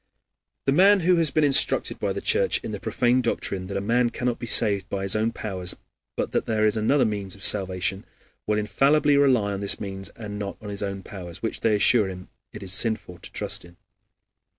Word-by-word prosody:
The 135 - +2
man 195 +6 +5
who 180 +1 +3
has 165 -3 +2
been 155 +2 +1
instructed 140 -2 +2
by - - -1
the - - -4
Church 470 +1 +2
in - - -5
the - - -5
profane 125 -1 +1
doctrine 95 -5 -3
that 100 0 -4
a - - -2
man 120 +4 +1
cannot 120 0 -3
be 120 - -6
saved 100 -3 +3
by 95 -1 -3
his 100 +1 +3
own 110 +2 0
powers, 95 -6 -2 0.4
but - - -3
that - - -1
there 110 -1 +1
is 105 0 +2
another 120 +6 +2
means 100 -3 -4
of 100 - -13
salvation, 95 0 +1 0.4
will 105 0 +1
infallibly 140 +7 +2
rely 130 -8 +3
upon 100 - -4
this 100 0 -1
means 95 -2 -5
and 105 -2 -7
not 100 -1 -5
on 105 - -9
his 100 0 -6
own 100 -1 -4
powers, 90 -2 -9
which, 115 - -3
they 110 -2 +2
assure 105 +1 +4
him, 90 -1 -9 0.2
it 105 - -9
is 95 -1 -3
sinful 110 -5 0
to - - -11
trust - - -3
in. 85 0 -17
105 Hz, 220 wpm, -24 LUFS, 95-125 Hz, 0.4 s, man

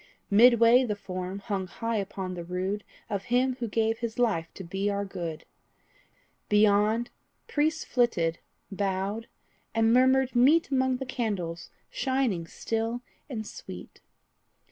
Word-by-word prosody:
Midway 235 +3 +7
the 215 -4 -1
form 185 -1 -5
hung 195 -2 -3
high 230 +3 -3
upon 190 -2 -4
the 175 -1 -5
rood 185 +4 -3 0.2
Of 200 -3 -3
him 250 +1 +1
who 235 - -2
gave 225 +1 0
his 230 -1 -4
life 200 -10 +1
to 190 - -7
be 195 +4 -2
our 200 0 -1
good; 170 -5 -6 1.0
Beyond, 210 +2 +3 0.4
priests 310 +1 0
flitted, 170 -10 +1 0.3
bowed, 195 +3 -2 0.5
and 225 0 +4
murmured 260 +1 +4
meet 285 +7 +5
Among 260 -1 +2
the 265 - -5
candles 200 -9 -3 0.2
shining 260 -11 0
still 225 +6 -3 0.3
and 220 -5 -4
sweet. 90 - -10
220 Hz, 130 wpm, -28 LUFS, 190-245 Hz, 1.0 s, Midway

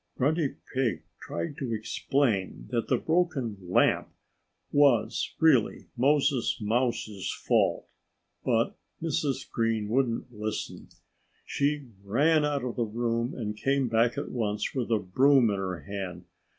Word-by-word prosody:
Grunty 150 +2 +1 0.2
Pig 130 -7 0 0.2
tried 85 +11 -4
to 120 -5 -2
explain 110 - -1
that 115 - 0
the - - +2
broken 160 -10 0
lamp 90 0 +2 0.6
was 140 -6 +3
really 150 -9 +3
Moses 140 0 +2
Mouse's 110 -3 -1
fault. - - +1 0.6
But - - +1 0.2
Mrs. 155 -4 -1
Green 115 -2 -1
wouldn't 125 0 0
listen. 105 0 -5 0.6
She 145 -2 -1
ran 150 +10 +3
out 145 -3 0
of 125 -2 -4
the 120 - +2
room 115 +2 -1
and 105 -3 -4
came 135 +2 +1
back 115 +1 +2
at - - -4
once 105 -3 -2
with 125 -4 -2
a 115 - +3
broom 125 +5 +4
in 100 - -1
her 95 -2 -3
hand. 95 -3 -6
120 Hz, 130 wpm, -28 LUFS, 105-140 Hz, 0.6 s, broom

